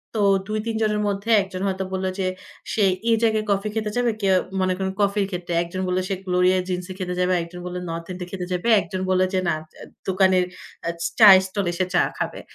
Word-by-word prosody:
তো 210 - +1 0.3
২ 215 0 -2
৩ 225 -1 -2
জনের 210 -1 +1
মধ্যে 200 +3 -3
১ 190 - -5
জন 185 - -4
হয়তো 190 0 -1
বলল 190 0 -2
যে, 185 - 0 0.5
সে 210 - +2 0.3
এই 225 - +5
জায়গায় 220 -1 +2
কফি 200 +2 0
খেতে 215 -1 -1
যাবে, 240 -1 +2
কেউ 190 -1 +3 0.3
মনে 185 0 +2
করেন 190 0 -2
কফির 200 0 +2
ক্ষেত্রে। 175 -1 -4
একজন 185 +2 -5
বলল, 180 0 +1
সে 195 - 0
গ্লোরিয়া 180 +1 +3
জিন্স 180 0 -2
এ - - -4
খেতে 180 -1 -3
যাবে, 180 0 +2
আর - - +2
একজন 175 +1 -10
বলল, 180 0 -5
নর্থ 165 0 -5
এন্ড 180 0 -7
এ - - -5
খেতে 185 -2 -4
যাবে। 180 +6 -2
একজন 185 +2 -5
বলল 185 0 +3
যে, 185 - +2
না, 170 - +2 0.5
দোকানের 190 -1 +3 0.8
চায়ের 195 -4 +10
স্টল 195 0 -2
এ, - - -6
সে 185 - +2
চা 175 - +4 0.2
খাবে। - - -3
185 Hz, 230 wpm, -23 LUFS, 180-205 Hz, 0.8 s, চায়ের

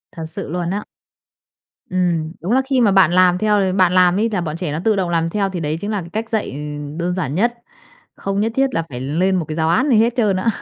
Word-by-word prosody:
Thật 165 -2 -5
sự 160 - -5
luôn 175 +1 -2
á. 205 +3 -2 1.1
Ừm. 175 -3 0
Đúng 180 +6 -3
là 260 - +4
khi 265 -2 +1
mà 215 -4 +4
bạn 190 -4 +5
làm 180 0 +4
theo 210 +1 +2
l 190 -2 +1
bạn 185 -2 +4
làm 185 +1 +4
ấy 225 +2 +1
là 195 -4 -1
bọn 160 -2 -4
trẻ 175 -4 -3
nó 150 - -2
tự 220 -1 +3
động 190 -3 -1
làm 165 -1 0
theo, 200 +2 -1
thì 185 -2 -4
đấy 155 0 -2
chính 205 - -3
là 205 -2 -1
cái 170 - -10
cách 225 +1 -3
dạy, 220 -2 -1
ừ, 135 - -7 0.4
đơn 175 +1 -1
giản 160 -6 -3
nhất. 235 +6 +2 0.6
Không 195 +1 -2
nhất 225 +2 0
thiết 270 -1 +1
là 165 - 0
phải 125 -2 -6
lên 170 +8 0
một 175 -3 -1
cái 155 - -4
giáo 160 0 +1
án 260 - +2
gì 240 - +4
hết 230 +2 +3
trơn 210 -6 +2
á. 185 - -2
185 Hz, 275 wpm, -19 LUFS, 165-210 Hz, 1.1 s, bạn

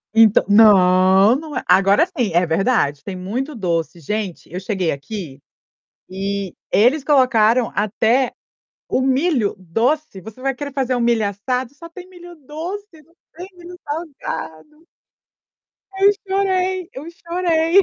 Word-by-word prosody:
Então 225 -2 +5
não! 195 0 +5
Não 300 0 -6
é - - -3
agora 195 - +4
sim, 255 - -3
é 175 +1 +3
verdade, 160 - 0
tem 195 - -6
muito 240 +11 -4
doce. 170 -4 -2
Gente, 195 +3 -5
eu 180 - -3
cheguei 190 -3 -2
aqui, 145 -1 -7 0.7
e 195 0 -4 0.2
eles 250 +8 +3
colocaram 250 -4 +3
até 225 +5 +1 0.6
o - - +1
milho 265 - +1
doce. 225 - -1
Você 220 +6 -12
vai 270 0 -1
querer 285 +1 -7
fazer 260 -2 -1
o - - -1
milho 235 -3 +1
assado, 250 +6 -3
só 335 +3 -11
tem 365 +2 -12
milho 350 -1 -13
doce, 335 +2 -7
não 330 +3 -29 0.2
tem 355 +3 -8
milho 355 0 -12
salgado. 300 - -7 1.1
Eu 395 +1 +6 0.2
chorei, 375 -2 -1
eu 265 - -8
chorei. 340 +1 +1
250 Hz, 140 wpm, -19 LUFS, 195-320 Hz, 1.1 s, Eu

